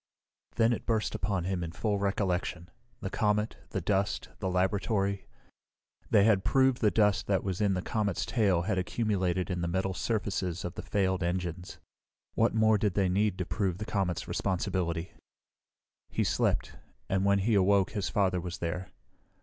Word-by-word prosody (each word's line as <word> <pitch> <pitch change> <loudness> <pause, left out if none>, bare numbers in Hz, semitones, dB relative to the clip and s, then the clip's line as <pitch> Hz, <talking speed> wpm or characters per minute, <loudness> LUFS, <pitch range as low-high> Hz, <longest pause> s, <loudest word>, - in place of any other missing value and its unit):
Then 115 +1 +3
it - - -5
burst 110 -2 0
upon 100 -4 -1
him 90 -1 -2
in 85 -1 -5
full 105 +2 -1
recollection 90 -3 -1 0.3
the 95 -2 -4
comet, 105 0 0
the 95 - -3
dust, 100 +3 0
the 95 - -1
laboratory. 100 +1 0 0.8
They 100 - +5
had 100 -3 +4
proved 130 -2 +3
the 110 - +5
dust 105 -4 +2
that 95 -2 +1
was 95 0 -2
in 100 -2 +2
the 90 - -2
comet's 105 -1 -1
tail 90 -2 +2
had 95 0 0
accumulated 95 -2 -1
in 90 -1 -2
the 85 - -1
metal 95 +2 -1
surfaces 95 -4 -2
of 90 - -4
the - - -6
failed 95 -2 0
engines. 90 0 -3 0.6
What - - +2
more 110 -1 +4
did 100 -3 0
they 95 -2 +2
need 100 +1 +1
to 90 - -2
prove 95 -4 -1
the 105 - -5
comet's 100 -5 -1
responsibility? 90 -2 -1 1.0
He - - 0
slept, - - 0 0.3
and 95 0 +1
when 100 0 +4
he 105 +4 +1
awoke 100 -1 +3
his 105 -3 -2
father 95 -4 +1
was 85 0 -5
there. 90 +2 -4
95 Hz, 170 wpm, -30 LUFS, 90-105 Hz, 1.0 s, They